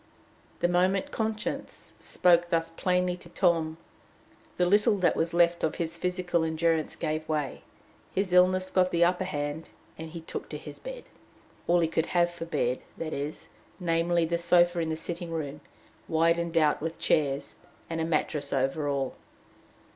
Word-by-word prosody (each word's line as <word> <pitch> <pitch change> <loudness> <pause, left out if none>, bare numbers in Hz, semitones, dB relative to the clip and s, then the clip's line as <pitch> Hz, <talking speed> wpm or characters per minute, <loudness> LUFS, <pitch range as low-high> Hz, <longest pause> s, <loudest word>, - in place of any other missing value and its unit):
The 175 - +4
moment 185 +2 +1
conscience 220 -1 -3
spoke 175 -1 +3
thus 165 -1 +1
plainly 180 +1 +1
to 170 - -13
Tom, 165 -3 +1 0.8
the 180 - +3
little 205 +3 +4
that 185 -2 +2
was 165 +1 0
left 170 0 +3
of 160 - +1
his 165 -1 -3
physical 180 -1 0
endurance 160 0 0
gave 155 +1 -3
way, 150 -3 -2 0.5
his 185 -1 -1
illness 185 +1 +4
got 185 -1 +3
the 170 -1 +3
upper 180 +2 +2
hand, 145 -2 -4 0.3
and 160 0 -6
he 165 +1 -8
took 160 - -7
to - - -5
his - - -10
bed - - -7 0.6
all 175 0 +4
he 165 - +3
could 160 0 0
have 175 0 +4
for 170 -1 -6
bed, 125 -7 -1 0.2
that 160 -1 -4
is 145 +2 -5 0.3
namely, 170 -1 +2
the 170 +1 -1
sofa 175 0 +4
in 165 -1 -1
the 160 - -1
sitting 170 +1 -5
room, 150 -3 -4 0.5
widened 165 +1 +2
out 155 -3 +3
with 165 +1 -3
chairs, 140 -2 0 0.3
and 165 -1 -3
a - - +1
mattress 150 -2 -1
over 135 +3 0
all. 135 -2 -1
170 Hz, 165 wpm, -28 LUFS, 160-180 Hz, 0.8 s, The